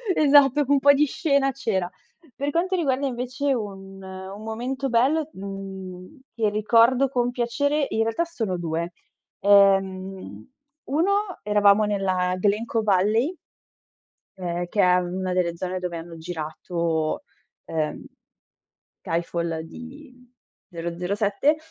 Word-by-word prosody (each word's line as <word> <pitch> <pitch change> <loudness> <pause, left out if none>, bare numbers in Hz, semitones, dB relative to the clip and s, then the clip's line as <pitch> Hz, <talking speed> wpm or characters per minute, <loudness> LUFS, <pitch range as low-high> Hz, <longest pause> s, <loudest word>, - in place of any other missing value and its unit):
esatto, 290 -1 +5
un 285 0 +4
po' 285 +1 +6
di 290 +2 +4
scena 280 -2 +1
c'era. 200 -9 -2 0.5
Per 280 +1 -2
quanto 360 +4 0
riguarda 280 -5 0
invece 255 +2 -1
un 195 -4 -6
un 190 +2 -8
momento 250 +5 -3
bello, 280 +6 +2
mhmm, 190 +3 -8
che 220 -3 +1
ricordo 230 +5 +4
con 245 -2 0
piacere, 285 +5 0
in 220 - 0
realtà 225 +10 0
sono 225 - -3
2. 170 0 -3 0.5
Ehm, 195 - +2 0.4
uno, 330 +8 +2 0.3
eravamo 210 0 +4
nella 185 -3 0
Glen 210 +3 +1
Coe 225 -1 -1
Valley 215 - +2 1.0
ehm, 175 -1 -3
che 205 +3 +1
è 180 0 +5
una 180 +1 -2
delle 175 -2 0
zone 185 +1 -3
dove 180 -2 -4
hanno 165 0 -9
girato, 160 - -3 0.4
ehm, 155 -2 -3 1.0
Skyfall 170 -1 -2
di 250 - -11 0.6
007. 195 - 0
205 Hz, 120 wpm, -24 LUFS, 180-260 Hz, 1.0 s, po